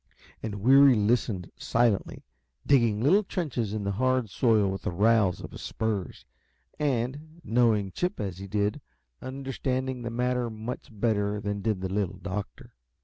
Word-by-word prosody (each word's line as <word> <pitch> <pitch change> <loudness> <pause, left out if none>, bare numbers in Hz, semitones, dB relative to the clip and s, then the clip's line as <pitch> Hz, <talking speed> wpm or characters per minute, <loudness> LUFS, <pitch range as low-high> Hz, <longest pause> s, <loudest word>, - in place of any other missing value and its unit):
And 105 -2 -5
Weary 135 +1 +7
listened 105 -3 0
silently, 115 -4 0 0.4
digging 115 -6 +3
little 185 +10 +5
trenches 135 - -2
in 105 -1 -3
the 100 - -1
hard 130 0 0
soil 110 -4 +3
with 95 -1 -5
the - - -2
rowels 100 0 +2
of - - -8
his - - -9
spurs, 105 -4 -3 0.5
and, 145 +4 -2
knowing 110 -4 +2
Chip 180 - -2
as 95 -4 -4
he 100 - -7
did, 105 +7 -1 0.4
understanding 130 -1 -3
the 120 - -4
matter 125 0 0
much 110 +3 -6
better 105 -1 0
than 100 0 -3
did 105 -2 -1
the 95 0 -3
Little 95 -2 -1
Doctor. 100 +1 -6
115 Hz, 150 wpm, -27 LUFS, 100-130 Hz, 0.5 s, Weary